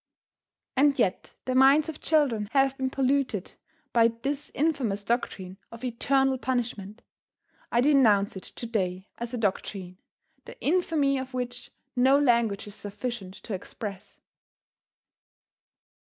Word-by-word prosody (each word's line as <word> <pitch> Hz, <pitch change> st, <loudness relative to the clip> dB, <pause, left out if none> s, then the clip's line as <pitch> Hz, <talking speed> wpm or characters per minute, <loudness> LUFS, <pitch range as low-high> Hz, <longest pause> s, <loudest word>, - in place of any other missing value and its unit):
And 280 Hz, +1 st, +4 dB
yet 195 Hz, -7 st, 0 dB
the 255 Hz, -, -1 dB
minds 270 Hz, +4 st, +6 dB
of 315 Hz, -2 st, -7 dB
children 260 Hz, -10 st, +2 dB
have 270 Hz, -1 st, +3 dB
been 265 Hz, -1 st, -1 dB
polluted 265 Hz, -6 st, 0 dB, 0.4 s
by 230 Hz, -1 st, +6 dB
this 270 Hz, +6 st, -4 dB
infamous 265 Hz, -10 st, 0 dB
doctrine 195 Hz, -5 st, -2 dB
of 230 Hz, +1 st, -11 dB
eternal 265 Hz, +2 st, +1 dB
punishment. 240 Hz, -5 st, -3 dB, 0.7 s
I 240 Hz, -, +3 dB
denounce 235 Hz, -9 st, +4 dB
it 190 Hz, -, -6 dB
to 235 Hz, -, -8 dB
day 190 Hz, -4 st, -2 dB
as 235 Hz, 0 st, -4 dB
a -, -, -3 dB
doctrine, 190 Hz, -3 st, -3 dB, 0.5 s
the -, -, -11 dB
infamy 300 Hz, -5 st, +1 dB
of 260 Hz, 0 st, -6 dB
which 245 Hz, -1 st, -4 dB, 0.3 s
no 260 Hz, +2 st, +5 dB
language 235 Hz, -7 st, +2 dB
is 205 Hz, -, -9 dB
sufficient 205 Hz, -1 st, -6 dB
to 220 Hz, -, -5 dB
express. 195 Hz, +1 st, -7 dB
245 Hz, 125 wpm, -27 LUFS, 205-270 Hz, 0.7 s, minds